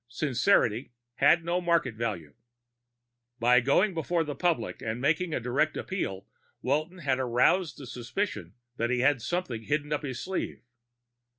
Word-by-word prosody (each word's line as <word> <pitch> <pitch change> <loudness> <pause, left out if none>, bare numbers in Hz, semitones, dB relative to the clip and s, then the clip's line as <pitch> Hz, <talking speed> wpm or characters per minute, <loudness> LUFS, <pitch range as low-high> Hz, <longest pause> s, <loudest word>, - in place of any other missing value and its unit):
Sincerity 125 - +1 0.2
had 170 -1 +4
no 175 +2 0
market 170 -8 +1
value. 100 -10 -4 1.0
By 125 +1 +5
going 160 - +3
before 165 +1 0
the 150 -2 -4
public 150 -6 -1
and 110 +1 -3
making 160 +6 +1
a - - 0
direct 130 +6 0
appeal, 100 - -3 0.4
Walton 155 +7 0
had 135 -6 0
aroused 130 +5 +2
the 140 - -9
suspicion 125 - -4 0.2
that 115 +1 0
he 125 0 +1
had 130 -1 +3
something 150 -7 -2
hidden 150 +4 -1
up 150 - -1
his 130 -4 -5
sleeve. 190 +7 -4
140 Hz, 150 wpm, -28 LUFS, 120-170 Hz, 1.0 s, By